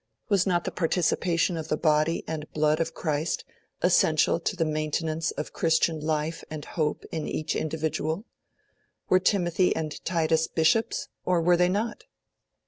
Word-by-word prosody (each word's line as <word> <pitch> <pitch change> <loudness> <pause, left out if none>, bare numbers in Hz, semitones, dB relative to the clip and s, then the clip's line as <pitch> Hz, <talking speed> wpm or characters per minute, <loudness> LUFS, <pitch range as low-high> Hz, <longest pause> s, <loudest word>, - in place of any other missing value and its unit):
Was 195 -2 +3
not 175 -2 +2
the - - -3
participation 170 +1 +1
of 160 -1 -5
the 155 - 0
Body 155 +1 +2
and 155 -1 -5
Blood 155 0 +2
of 165 0 -2
Christ 155 0 -1 0.4
essential - - +4
to 210 - -2
the 165 -2 0
maintenance 155 +1 -1
of 150 - -5
Christian 160 0 +2
life 155 +1 -2
and 155 -2 -6
hope 155 -3 -2
in 155 -2 -3
each 155 0 -2
individual? 160 +4 -2 0.8
Were 185 - +5
Timothy 180 -1 +2
and 155 -2 -4
Titus 160 -2 +1
Bishops? 165 +8 +1 0.2
Or 180 -1 +2
were 175 +2 +4
they 180 +1 +3
not? 215 +4 -2
160 Hz, 150 wpm, -27 LUFS, 155-175 Hz, 0.8 s, Were